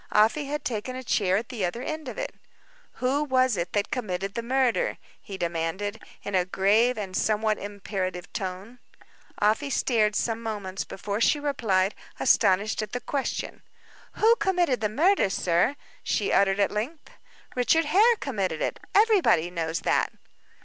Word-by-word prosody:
Afy 225 +8 +3
had 295 +2 -4
taken 245 +2 -3
a 260 - -6
chair 195 -5 +2
at 220 +2 -4
the 230 -6 -4
other 210 +8 -2
end 310 -2 -5
of 245 - -6
it. - - -4 0.6
"Who 270 +4 0
was 255 -4 +2
it 175 -1 -3
that 205 -1 0
committed 195 -5 -3
the 235 - -3
murder?" 255 0 +1 0.2
he 195 -3 -8
demanded, 175 +5 -3 0.2
in 200 - -5
a 185 -1 +3
grave 205 +7 +2
and 195 -3 -5
somewhat 215 0 +1
imperative 190 -3 -5
tone. 195 +6 -5 0.6
Afy 220 +8 +2
stared 220 -5 +1
some 230 -1 -1
moments 205 -4 -4
before 205 +2 -4
she 295 - +3
replied, 215 -9 +1 0.3
astonished 200 +4 +3
at 215 -1 -6
the 245 - -1
question. 270 +3 -3 0.5
"Who 455 +2 +4
committed 350 - +1
the 215 - +1
murder, 320 - +3
sir?" 180 +8 +1 0.3
she - - -1
uttered 195 0 +3
at 200 - +2
length. 255 +10 -4 0.4
"Richard 310 +6 +3
Hare 415 +10 +5
committed 195 - -2
it. - - -2 0.2
Everybody 395 - +4
knows 165 -1 -2
that." - - +1
215 Hz, 155 wpm, -26 LUFS, 195-260 Hz, 0.6 s, Hare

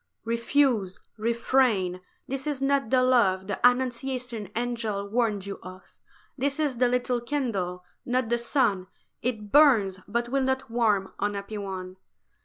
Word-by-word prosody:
"REFUSE, 235 -4 +1 0.2
refrain: 230 -4 +1
for - - -31 0.2
this 270 +2 -4
is 290 -3 -2
not 275 -3 +1
the 255 0 +4
love 205 -7 +3
The 200 -1 -4
Annunciation 245 -3 0
Angel 225 -4 -2
warned 215 -3 0
you 200 0 -6
of; 185 +1 -12 0.4
This 280 +2 -1
is 290 -5 0
the 250 +1 +4
little 245 0 0
candle, 220 -10 -2 0.2
not 250 -1 0
the 240 0 +1
sun; 230 -7 +1 0.3
It 215 -4 -3
burns, 225 -11 +5
but 235 +3 -1
will 275 +2 +1
not 265 -2 -1
warm, 215 -5 +1
unhappy 205 +1 -3
one!" 190 -2 -6
235 Hz, 145 wpm, -27 LUFS, 200-255 Hz, 0.4 s, burns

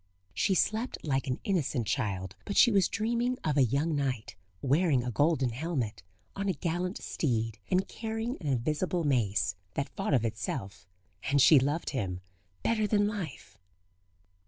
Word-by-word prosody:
She 190 - +2
slept 220 +7 +1
like 135 -3 0
an 125 - -1
innocent 150 - 0
child, 100 -4 -2
but 200 - -4
she 240 - +7
was 195 -3 +4
dreaming 235 +4 0
of 150 -2 0
a 140 - +5
young 145 +6 +1
knight, 130 -6 -2 0.3
wearing 140 -1 +3
a 125 - -2
golden 135 -1 +2
helmet, 125 - -3 0.3
on 200 0 -1
a - - +2
gallant 175 +4 -2
steed, 115 -6 -2
and 185 +1 +2
carrying 225 +2 -3
an 155 - -4
invisible 150 +7 0
mace, 110 - +1 0.2
that 140 - -1
fought 195 -7 +1
of 120 -3 +2
itself;... 100 -4 -4 0.4
and 140 +1 +3
she 140 +2 +8
loved 145 +5 -1
him 95 -9 -3 0.4
better 215 -2 +2
than 205 -1 +3
life. 195 - -6
145 Hz, 155 wpm, -30 LUFS, 120-190 Hz, 0.4 s, she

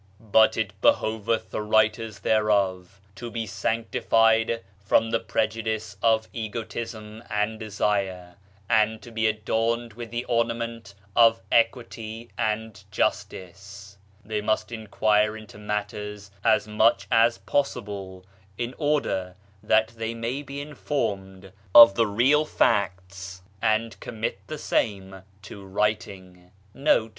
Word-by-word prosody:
"But 110 0 +4
it 105 -3 -1
behoveth 110 +1 +1
the - - -2
writers 110 0 +1
thereof 100 -4 +1
to 120 +4 -7
be 115 -1 -4
sanctified 115 +1 +1 0.2
from 115 +3 +2
the 115 - +2
prejudice 110 -1 -2
of 110 -1 +2
egotism 110 -1 -6
and 110 +1 -1
desire 100 -4 -2 0.3
and 110 +1 +2
to 120 - -11
be 110 -1 +1
adorned 115 +2 -1
with 120 +1 -8
the 120 +2 -4
ornament 115 -3 -2 0.2
of 115 -3 +5
Equity 115 -1 -1
and 110 -2 -2
Justice; 100 +1 -4 0.3
they 105 0 -2
must 110 +1 -1
inquire 110 -1 +1
into 110 -1 -13
matters 105 -1 -5
as 110 - +3
much 105 -1 +2
as 115 0 +4
possible, 100 -5 -3 0.3
in 120 +1 -3
order 140 - 0 0.3
that 110 +1 +3
they 115 0 -5
may 115 +4 -3
be 140 0 -7
in 150 +1 -9
formed 95 -10 -3 0.2
of 115 0 +11
the 115 -1 +2
real 130 +9 +3
facts, 95 -6 -1 0.2
and 115 +1 0
commit 110 -4 -4
the 155 - -5
same 95 -7 -2 0.2
to 100 -1 -10
writing." 95 -3 -3
110 Hz, 120 wpm, -25 LUFS, 100-115 Hz, 0.3 s, of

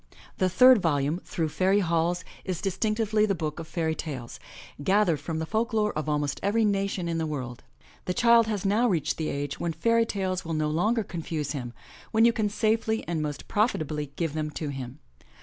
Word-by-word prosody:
The 185 - +3
third 250 +3 +7
volume, 150 0 +1
Through 160 -3 -2
Fairy 190 +5 +2
HallSy 170 0 0 0.2
is 185 -4 -3
distinctively 215 +2 +1
the 195 - +1
book 155 -1 -4
of 165 - -7
fairy 160 -1 -1
tales, 135 -7 -6 0.4
gathered 190 -3 +3
from 165 -2 -4
the 160 - -2
folk 225 +6 -1
lore 210 -1 +1
of 155 0 -3
almost 145 -1 -1
every 215 +3 +2
nation 195 -3 0
in 165 -1 -1
the 160 - -1
world. 130 -5 -5 0.4
The 180 - -2
child 235 -1 +5
has 210 -3 -2
now 215 +5 +3
reached 170 -7 0
the 155 - -2
age 140 0 -3
when 170 -1 -1
fairy 230 +7 +2
tales 190 -2 -2
will 165 -1 -3
no 155 -1 0
longer 215 +8 +1
confuse 165 -5 -4
him, 125 -5 -4 0.4
when 225 0 +4
you 235 - +5
can 215 -3 0
safely 220 +1 0
and 165 -2 -1
most 150 -1 -4
profitably 155 - 0
give 165 -4 -2
them 155 -1 -2
to 150 0 -4
him. 135 -1 -6
175 Hz, 200 wpm, -27 LUFS, 155-210 Hz, 0.4 s, third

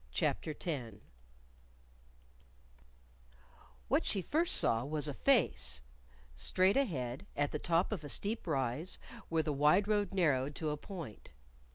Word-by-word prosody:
CHAPTER 155 - -1
X 130 - -3 2.9
What - - +2
she 195 - -1
first 330 - +1
saw 115 0 +3
was 150 +1 -2
a 145 - -2
face! 135 - +2 0.5
straight 185 +1 +3
ahead, 135 - -1
at 145 0 +1
the 150 - -2
top 170 +5 +1
of 205 -7 -3
a 145 - -7
steep 210 +4 -2
rise, 140 +3 0 0.3
where 160 -1 +2
the 150 - -1
wide 150 +8 +4
road 205 -1 +1
narrowed 145 -7 +1
to 155 -2 -2
a - - -1
point. 165 - -8
155 Hz, 135 wpm, -34 LUFS, 135-190 Hz, 2.9 s, wide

